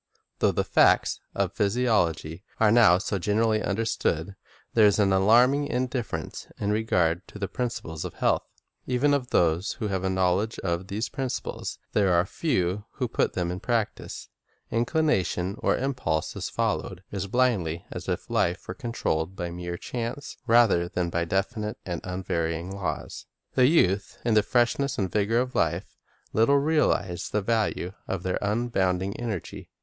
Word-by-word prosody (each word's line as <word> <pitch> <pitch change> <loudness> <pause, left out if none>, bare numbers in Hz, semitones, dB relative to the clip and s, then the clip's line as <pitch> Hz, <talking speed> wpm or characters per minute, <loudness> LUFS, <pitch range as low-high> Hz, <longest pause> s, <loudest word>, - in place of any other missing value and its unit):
Though - - +4
the - - 0
facts - - +3 0.2
of 100 -1 0
physiology 100 -7 +1 0.2
are 110 -2 +5
now 110 -7 +6
so 100 0 -2
gen 105 +4 0
erally 110 -1 +2
understood, 100 -4 -1 0.4
there 110 -2 +6
is 100 - +3
an 100 -2 +3
alarming 120 +9 +4
indifference 125 -2 -3
in 100 - 0
regard 90 -5 +1
to - - -11
the 100 -1 -2
principles 95 -11 -4
of - - -6
health. - - +2 0.5
Even 130 +3 +2
of 130 -3 0
those 85 +3 +2
who 110 -4 -4
have 95 -1 -2
a 95 - +1
knowledge 95 +4 +1
of 85 0 -1
these 105 +5 -2
principles, 135 -2 -4 0.2
there 100 -3 +3
are 85 +1 +3
few 100 - -1
who 125 - -2
put 120 - 0
them 90 -1 -1
in 90 - -4
practise. 115 -2 -2 0.4
Inclination 115 - +1
or - - +1
impulse 125 - -1
is - - -4
followed 90 0 -2
as 100 -1 -3
blindly 100 -9 +1
as - - -6
if - - -2
life 90 +2 0
were - - -4
controlled 95 - -2
by 85 -2 -4
mere 85 0 -5
chance 120 +6 -5
rather 115 -7 +5
than 90 -2 -2
by 85 0 0
definite 100 +4 -2
and 85 -3 -4
unvarying 90 -1 -2
laws. 85 -6 -4 0.3
The 125 -1 +5
youth, 100 - +2
in 115 - +2
the 105 - +6
freshness 125 +4 +1
and 95 -4 -1
vigor 105 +2 +1
of 125 0 -1
life, 85 +3 -1 0.4
little 115 +6 +4
realize 140 - +1
the 105 -1 -1
value 110 -4 0 0.2
of 95 -3 -3
their 95 - -1
abounding 100 -3 0
energy. 110 -7 -5
100 Hz, 160 wpm, -26 LUFS, 90-120 Hz, 0.5 s, now